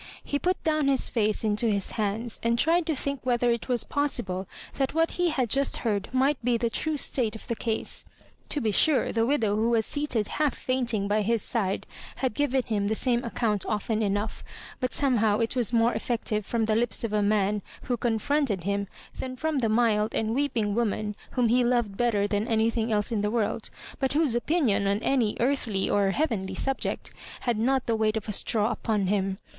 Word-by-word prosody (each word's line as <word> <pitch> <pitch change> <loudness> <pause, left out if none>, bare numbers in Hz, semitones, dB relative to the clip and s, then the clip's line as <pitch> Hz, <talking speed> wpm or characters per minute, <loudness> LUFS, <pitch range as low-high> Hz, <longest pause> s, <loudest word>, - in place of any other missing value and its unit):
He 285 - -2
put 365 +3 -1
down 310 -2 +1
his 270 -1 +1
face 215 -2 0
into 215 +2 +1
his 200 -3 0
hands, 220 +2 -2
and 235 0 +1
tried 330 +5 +2
to 320 - +1
think 280 0 -2
whether 245 -1 +2
it 235 +2 -3
was 245 -2 +2
possible 220 -10 -1 0.3
that 270 +2 -1
what 325 0 +2
he 355 -1 +1
had 265 -6 0
just 275 +4 +2
heard 205 -3 -1
might 260 0 +1
be 240 0 +2
the 230 0 -1
true 315 +4 -1
state 235 -6 0
of 220 - -10
the 235 - -1
case. 225 -1 -1 0.5
To 295 - -1
be 225 -5 0
sure, 280 +7 +3
the 225 0 +1
widow 230 -7 +1
who 220 +2 +1
was 225 -2 +2
seated 270 -8 -1
half 300 -3 0
fainting 240 -6 -1
by 210 +1 +2
his 225 +1 +1
side 200 -6 -1 0.3
had 260 -4 -1
given 270 0 +1
him 210 -4 -1
the 220 - 0
same 240 +1 +2
account 225 -4 -1
ofSn 215 +1 -1
enough, 205 +1 -1 0.4
but 255 -2 -1
somehow 225 -7 +2
it 230 +2 0
was 240 -4 +2
more 235 0 +3
effective 215 -3 -2
from 230 -2 0
the 215 0 +1
lips 235 +1 0
of 225 -2 -2
a 210 - +2
man 205 0 +1 0.2
who 245 - -1
confronted 235 - 0
him 200 +1 -1 0.3
than 255 -1 -4
from 310 +2 -1
the 230 -3 +1
mild 220 -1 +2
and 220 0 0
weeping 240 -6 0
woman 210 -2 -1 0.2
whom 250 -2 +2
he 245 +2 +3
loved 240 -4 +1
better 220 -3 +1
than 205 +2 -1
anything 225 0 +1
else 210 +1 +1
in 220 -3 0
the 210 - 0
world, 220 -1 -1 0.3
but 265 -1 0
whose 300 -4 +2
opinion 240 - +1
on 200 0 +2
any 240 -6 +1
earthly 235 -6 0
(or 200 -1 +2
heavenly) 220 -6 -1
subject 270 0 -2 0.3
had 240 -3 0
not 260 +2 +2
the 230 - +1
weight 220 0 +1
of 220 - -5
a 210 - -2
straw 215 +2 +1
upon 215 -3 -1
him. 195 0 0
230 Hz, 205 wpm, -27 LUFS, 210-255 Hz, 0.5 s, sure